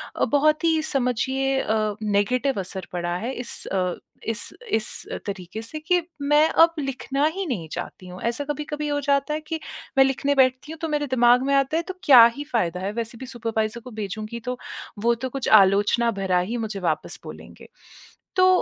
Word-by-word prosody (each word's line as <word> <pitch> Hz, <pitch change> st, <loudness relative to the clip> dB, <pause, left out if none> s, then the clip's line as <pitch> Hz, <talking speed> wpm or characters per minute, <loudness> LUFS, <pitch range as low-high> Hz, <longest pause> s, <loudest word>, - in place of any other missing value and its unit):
अ, -, -, +2 dB
बहुत 305 Hz, +2 st, +2 dB
ही 320 Hz, -1 st, +3 dB
समझिए 265 Hz, 0 st, 0 dB
अ, 215 Hz, -1 st, 0 dB
नेगेटिव 215 Hz, +4 st, +1 dB
असर 190 Hz, 0 st, -4 dB
पड़ा 175 Hz, 0 st, -2 dB
है 240 Hz, +7 st, -4 dB
इस 245 Hz, -2 st, -4 dB
अ, 180 Hz, -2 st, -1 dB, 0.3 s
इस 220 Hz, -2 st, -2 dB, 0.2 s
इस 220 Hz, -, +1 dB, 0.4 s
तरीक़े 195 Hz, +1 st, -5 dB
से 310 Hz, +7 st, -6 dB
कि 350 Hz, +3 st, +2 dB, 0.2 s
मैं 295 Hz, +2 st, +4 dB
अब 330 Hz, 0 st, +5 dB
लिखना 275 Hz, 0 st, -1 dB
ही 390 Hz, -1 st, -2 dB
नहीं 190 Hz, -, -3 dB
चाहती 180 Hz, +1 st, -7 dB
हूँ। 180 Hz, 0 st, -9 dB
ऐसा 235 Hz, +4 st, -1 dB
कभी-कभी 295 Hz, 0 st, -3 dB
हो 290 Hz, 0 st, 0 dB
जाता 280 Hz, +1 st, +1 dB
है 310 Hz, -, -2 dB
कि 320 Hz, 0 st, -3 dB, 0.4 s
मैं 270 Hz, -, +8 dB
लिखने 280 Hz, +1 st, 0 dB
बैठती 260 Hz, +2 st, +2 dB
हूँ 320 Hz, -, -11 dB
तो 325 Hz, -, -1 dB
मेरे 295 Hz, -1 st, 0 dB
दिमाग 245 Hz, -1 st, +4 dB
में 280 Hz, -, +2 dB
आता 275 Hz, +3 st, +2 dB
है 335 Hz, -, 0 dB
तो 375 Hz, -, -4 dB
क्या 250 Hz, -5 st, +9 dB
ही 290 Hz, -, -4 dB
फ़ायदा 180 Hz, -7 st, 0 dB
है। 195 Hz, +2 st, -2 dB
वैसे 230 Hz, +1 st, -4 dB
भी 260 Hz, -, -6 dB
सुपरवाइज़र 230 Hz, -1 st, -2 dB
को 250 Hz, +1 st, -11 dB
भेजूँगी 215 Hz, +2 st, -5 dB
तो 250 Hz, -, -3 dB, 0.5 s
वो 235 Hz, 0 st, +4 dB
तो -, -, -2 dB
कुछ 270 Hz, 0 st, -3 dB
आलोचना 205 Hz, +5 st, +2 dB
भरा 185 Hz, -2 st, +2 dB
ही 205 Hz, +7 st, -2 dB
मुझे 215 Hz, -3 st, -3 dB
वापस 180 Hz, -, -2 dB
बोलेंगे। -, -, -11 dB, 0.7 s
तो 370 Hz, -, +6 dB
250 Hz, 195 wpm, -24 LUFS, 215-285 Hz, 0.7 s, क्या